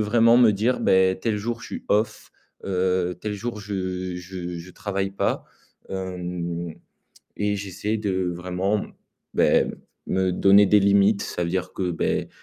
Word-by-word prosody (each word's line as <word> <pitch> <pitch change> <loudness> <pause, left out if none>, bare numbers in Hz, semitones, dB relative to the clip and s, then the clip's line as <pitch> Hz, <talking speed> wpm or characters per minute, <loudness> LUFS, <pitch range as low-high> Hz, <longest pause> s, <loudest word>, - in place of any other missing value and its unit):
vraiment 115 +2 +5
me 120 -3 +7
dire: 110 +6 +1
«Beh 95 0 +3
tel 110 0 0
jour 115 +3 -3
je - - -9
suis - - -7
off, 105 +1 0 0.3
heu, 90 -2 0
tel 105 -1 -3
jour 110 +1 -5
je 95 -2 -3
je 90 -1 -6
je 85 +2 -10
travaille 95 0 -2
pas». 100 - -1 0.4
Hem 90 -3 -4 0.6
et 105 0 +1
j'essaie 100 +2 -3
de 105 -2 -2
heu, 95 -1 0
vraiment 90 +4 -1 0.5
beh, - - +4 0.4
me 95 0 +1
donner 100 +3 +6
des 105 +1 +5
limites, 100 +1 +4
ça 90 - -3
veut 85 - -2
dire 90 0 -2
que 90 -2 -1
beh, 85 - -1
95 Hz, 160 wpm, -24 LUFS, 90-105 Hz, 0.6 s, me